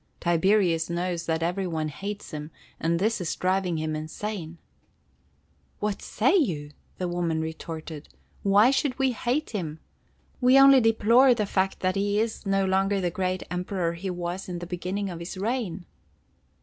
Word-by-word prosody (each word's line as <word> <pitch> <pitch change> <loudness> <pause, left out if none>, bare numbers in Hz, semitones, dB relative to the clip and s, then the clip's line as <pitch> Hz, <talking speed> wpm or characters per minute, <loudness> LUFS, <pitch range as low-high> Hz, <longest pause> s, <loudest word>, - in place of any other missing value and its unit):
"Tiberius 175 0 +2
knows 175 0 -2
that 160 0 0
every 180 +3 -1
one 160 -2 -2
hates 200 +7 -6
him, 150 0 -6 0.3
and 165 +1 +1
this 210 +3 0
is 170 - -2
driving 185 -2 0
him 155 0 -2
insane." 165 +2 -5 1.2
"What 210 -1 -2
say 255 - +2
you?" 160 - 0 0.3
the 180 - -2
woman 175 -2 -1
retorted. 160 -1 -6 0.3
"Why 205 +5 +5
should 270 -1 0
we 265 -1 +2
hate 250 +6 -1
him? 160 -7 -4 0.6
We 255 +2 +6
only 275 -1 +8
deplore 230 +3 +5
the 215 -2 0
fact 190 -1 -1
that 185 0 +1
he 205 +1 +1
is 220 -1 -2
no 195 0 +2
longer 195 +1 +2
the 180 -2 -1
great 185 0 -2
Emperor 180 -1 -1
he 180 +3 -5
was 180 +1 -4
in 175 - -4
the 175 - -6
beginning 185 +3 -3
of 170 - -7
his 170 +3 -7
reign." 200 -4 -2
185 Hz, 160 wpm, -26 LUFS, 170-210 Hz, 1.2 s, only